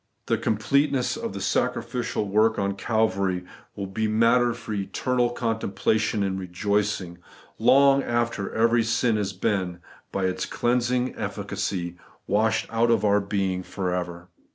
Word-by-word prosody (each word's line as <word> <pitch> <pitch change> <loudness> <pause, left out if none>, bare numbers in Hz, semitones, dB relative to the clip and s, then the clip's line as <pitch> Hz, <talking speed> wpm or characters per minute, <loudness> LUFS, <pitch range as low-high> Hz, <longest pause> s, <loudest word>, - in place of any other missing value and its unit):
The - - 0
completeness 130 +4 +1
of - - -4
the 100 - -5
sacrificial 120 0 -1
work 110 +3 +3
on 100 0 0
Calvary 100 -3 0 0.3
will 100 - -4
be 110 +3 -2
matter 115 +3 +3
for 115 -2 -6
eternal 120 +5 0
contempla 115 -2 0
tion 110 -1 0
and 95 -1 -1
rejoicing, 95 -1 -1 0.4
long 135 +4 +5
after 120 -5 -1
every 115 +1 +3
sin 115 +1 +1
has 100 -2 -1
been, 95 -2 -1 0.3
by 95 -1 -1
its 95 0 -1
cleansing 125 +1 0
efl&cacy, 90 -2 -3 0.3
washed 110 +2 +1
out 115 +1 +3
of 110 -3 +3
our 100 0 +4
being 100 -2 -1
for 90 -1 -3
ever. 90 -1 -4
110 Hz, 140 wpm, -25 LUFS, 95-120 Hz, 0.4 s, long